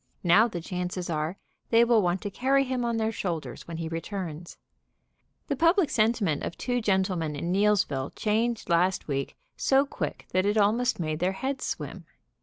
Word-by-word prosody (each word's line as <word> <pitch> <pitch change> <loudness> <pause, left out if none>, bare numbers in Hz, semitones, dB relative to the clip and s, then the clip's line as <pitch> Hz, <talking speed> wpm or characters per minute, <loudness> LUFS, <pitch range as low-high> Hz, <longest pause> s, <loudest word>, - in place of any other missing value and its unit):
Now 190 +6 +6
the 175 -7 -5
chances 180 0 -4
are 155 +4 -2 0.3
they 230 0 +6
will 235 -2 +4
want 180 0 0
to 205 - -4
carry 270 +5 +2
him 255 -2 -2
on 235 -1 0
their 220 0 0
shoulders 175 -7 -4
when 165 -1 -6
he 165 -1 -3
returns. 165 0 -5 0.9
The 285 - 0
public 335 +2 +3
sentiment 215 -8 +1
of - - -5
two 245 -1 -1
gentlemen 190 -7 0
at 145 - -5
Neillsville 180 -7 +1
changed 225 +2 0
last 180 +2 +2
week 140 -2 -3 0.2
so 270 +1 +3
quick 275 - -5
that 185 +2 +2
it 205 +1 +1
almost 220 +4 +2
made 155 -2 -2
their 180 +2 +1
heads 265 +7 -3
swim. - - -5
195 Hz, 175 wpm, -27 LUFS, 170-235 Hz, 0.9 s, Now